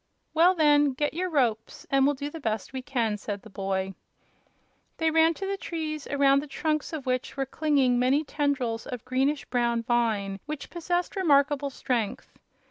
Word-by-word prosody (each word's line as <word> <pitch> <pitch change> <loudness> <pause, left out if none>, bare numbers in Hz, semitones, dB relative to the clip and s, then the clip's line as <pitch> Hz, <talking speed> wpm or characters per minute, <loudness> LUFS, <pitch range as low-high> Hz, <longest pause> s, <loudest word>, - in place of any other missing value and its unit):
"Well, 345 +4 +5
then, 295 -3 +4
get 295 +3 -1
your 365 +3 -2
ropes, 235 -8 -1
and 275 0 +4
we'll 290 - +2
do 285 +2 -5
the 325 - -7
best 220 -3 -3
we 260 - -3
can," 235 -5 -1
said 205 -1 -5
the 220 - -13
boy. 190 -1 -2 1.0
They 320 -1 +1
ran 325 +1 +4
to 390 - -5
the 395 0 -2
trees, 310 -5 -4
around 275 -1 +3
the 300 - -8
trunks 305 +2 -2
of 305 -4 -5
which 255 +1 -2
were 270 - 0
clinging 270 -3 +2
many 265 +5 +3
tendrils 275 -6 -1
of 250 -2 -6
greenish 270 +3 0
brown 235 -2 0
vine 220 -5 0
which 300 -1 -6
possessed 350 +1 -2
remarkable 285 -5 +3
strength. 240 -5 -3
275 Hz, 175 wpm, -27 LUFS, 240-305 Hz, 1.0 s, Well